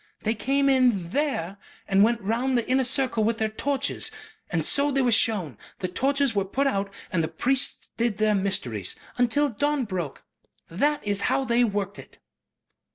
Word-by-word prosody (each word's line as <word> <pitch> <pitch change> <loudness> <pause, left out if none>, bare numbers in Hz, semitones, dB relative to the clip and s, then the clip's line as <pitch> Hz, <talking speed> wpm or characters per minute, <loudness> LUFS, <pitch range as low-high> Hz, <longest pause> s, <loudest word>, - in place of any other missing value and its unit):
They 220 - +1
came 275 +6 +1
in 245 -10 +2
THERE 205 - -1 0.3
and 195 +1 +4
went 230 +1 +2
round 240 +6 0
the 235 - -1
inner 260 +1 +2
circle 255 -3 +1
with 225 +1 +1
their 220 -1 0
torches. 275 +5 -1 0.4
And - - -1
so 285 +1 +4
they 270 -1 +1
were 245 - +2
shown. 200 - +1 0.2
The 185 - -3
torches 275 +6 +1
were 200 -2 +1
put 260 +9 -1
out 200 -7 0 0.2
and 170 -5 +1
the - - 0
priests 265 +8 -1
did 230 -3 0
their 215 0 +2
mysteries. 130 - -1 0.2
Until 265 +4 +3
dawn 285 +3 0
broke. 180 -8 -5 0.5
That 290 - 0
is 200 -1 +1
how 270 - +1
they 240 0 +3
worked 205 -3 -2
it." - - -13
230 Hz, 175 wpm, -25 LUFS, 200-270 Hz, 0.5 s, and